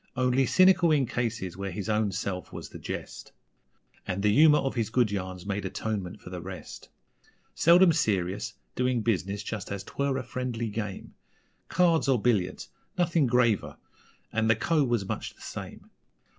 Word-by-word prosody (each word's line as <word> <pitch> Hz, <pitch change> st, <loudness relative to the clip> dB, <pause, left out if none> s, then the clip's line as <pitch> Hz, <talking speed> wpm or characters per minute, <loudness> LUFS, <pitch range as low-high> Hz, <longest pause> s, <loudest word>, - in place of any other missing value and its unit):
Only 130 Hz, 0 st, +2 dB
cynical 185 Hz, -2 st, +5 dB
in 145 Hz, -3 st, +3 dB
cases 115 Hz, -7 st, -3 dB
where 100 Hz, +1 st, -4 dB
his 95 Hz, +1 st, -5 dB
own 105 Hz, -1 st, +1 dB
self 90 Hz, 0 st, -4 dB
was -, -, -8 dB
the -, -, -10 dB
jest, -, -, -7 dB, 0.7 s
And 95 Hz, +1 st, -2 dB
the 105 Hz, -1 st, +4 dB
humour 150 Hz, +4 st, +7 dB
of 135 Hz, -, -1 dB
his 115 Hz, -4 st, -1 dB
good 115 Hz, -2 st, +2 dB
yarns 95 Hz, -2 st, -4 dB
made 100 Hz, 0 st, -2 dB
atonement 100 Hz, 0 st, -4 dB
for 90 Hz, -, -10 dB
the 90 Hz, -1 st, -5 dB
rest. 95 Hz, +1 st, -9 dB, 0.6 s
Seldom 170 Hz, +1 st, +6 dB
serious 105 Hz, -, -1 dB, 0.2 s
doing 125 Hz, -2 st, 0 dB
business 100 Hz, -2 st, -1 dB
just 105 Hz, -3 st, -5 dB
as 100 Hz, -1 st, -4 dB
'twere 140 Hz, +4 st, -1 dB
a 130 Hz, -, -3 dB
friendly 120 Hz, -2 st, -3 dB
game 105 Hz, -2 st, -5 dB, 0.6 s
Cards 165 Hz, -3 st, +3 dB
or 130 Hz, -3 st, +3 dB
billiards 100 Hz, -6 st, 0 dB, 0.3 s
nothing 170 Hz, -5 st, +2 dB
graver. 120 Hz, -4 st, +2 dB, 0.6 s
And 110 Hz, 0 st, +1 dB
the 115 Hz, -, +5 dB
Co. 155 Hz, +6 st, +2 dB
was 120 Hz, -7 st, 0 dB
much -, -, -4 dB
the -, -, -21 dB
same. -, -, -8 dB
115 Hz, 165 wpm, -28 LUFS, 100-130 Hz, 0.7 s, humour